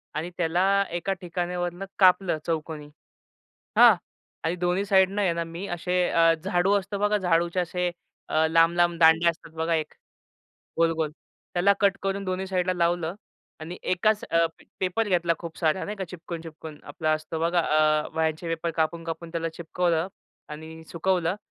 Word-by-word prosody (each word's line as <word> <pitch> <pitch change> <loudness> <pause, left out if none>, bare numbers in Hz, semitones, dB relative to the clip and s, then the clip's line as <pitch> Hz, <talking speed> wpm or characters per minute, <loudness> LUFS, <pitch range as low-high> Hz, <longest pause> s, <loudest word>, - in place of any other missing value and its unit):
आणि 160 +3 -3
त्याला 175 +1 +1 0.3
एका 175 +3 -1
ठिकाणावरनं 175 +1 -3
कापलं 185 -3 +4
चौकोनी, 155 -2 -3 0.9
हां? - - +9 0.5
आणि 165 +2 0
दोन्ही 180 +2 0
साइडनं 195 +1 +3
आहे 185 -4 +2
ना 170 0 -2
मी 165 +3 -7
असे 180 +1 0
अ, 165 0 +4
झाडू 190 +1 +2
असतं 200 +1 -6
बघा, 210 +1 +2
झाडूचे 175 -1 +1
असे 180 0 -1 0.4
अ, 160 0 +3
लांब-लांब 170 +1 +3
दांड्या 160 +1 +6
असतात 165 0 -16
बघा 160 +1 0
एक, 155 -1 -3 0.9
गोल-गोल. 165 -2 +1 0.4
त्याला 185 +3 +4
कट 200 -1 +3
करून 195 0 -2
दोन्ही 185 0 -2
साइडला 185 -1 0
लावलं 170 -1 0 0.5
आणि 170 +3 -7
एकाच 210 +4 +1
अ, 165 0 +4 0.4
पेपर 190 +4 0
घेतला 175 -3 +2
खूप 170 -2 -8
सारा 165 +2 +1
नाही 210 - -5
का 195 - -3
चिकटवून-चिकटवून 165 -3 -8
आपला 155 +2 -1
असतो 155 +1 -3
बघा 170 +1 +2
आ 155 -1 +2
वह्यांचे 160 +1 -1
पेपर 165 +1 -2
कापून-कापून 165 +1 -2
त्याला 165 -1 -2
चिकटवलं 170 +1 -1 0.4
आणि 160 +2 -9
सुकवलं 175 +1 0
170 Hz, 150 wpm, -26 LUFS, 160-185 Hz, 0.9 s, हां